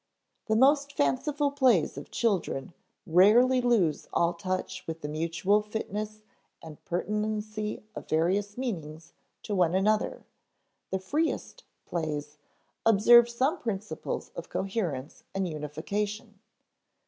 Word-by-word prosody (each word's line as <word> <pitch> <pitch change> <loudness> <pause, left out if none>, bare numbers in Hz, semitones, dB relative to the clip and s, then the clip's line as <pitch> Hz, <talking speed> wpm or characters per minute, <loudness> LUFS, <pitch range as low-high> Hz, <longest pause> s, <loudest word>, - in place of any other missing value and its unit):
The 220 - +2
most 280 +4 +4
fanciful 285 - +1
plays 255 - +3
of 140 - -8
children 185 - -1 0.3
rarely 230 +9 +5
lose 220 -11 +2
all 170 0 +2
touch 185 +1 -4
with 165 0 -5
the 145 - -4
mutual 165 +7 +1
fitness 215 0 -5 0.4
and 155 -2 -12
pertinency 215 +3 -2
of - - -8
various 190 +7 +1
meanings 165 - -5 0.3
to 210 - -4
one 180 -2 +2
another; 210 +3 +1 0.7
the 190 - 0
"freest" 305 - -2 0.2
plays 150 -3 -4 0.4
observe 235 +2 +7
some 265 +9 0
principles 210 -3 -4
of - - -7
coherence 175 - -3
and 195 -1 0
unification. 200 - -4
205 Hz, 110 wpm, -28 LUFS, 165-225 Hz, 0.7 s, observe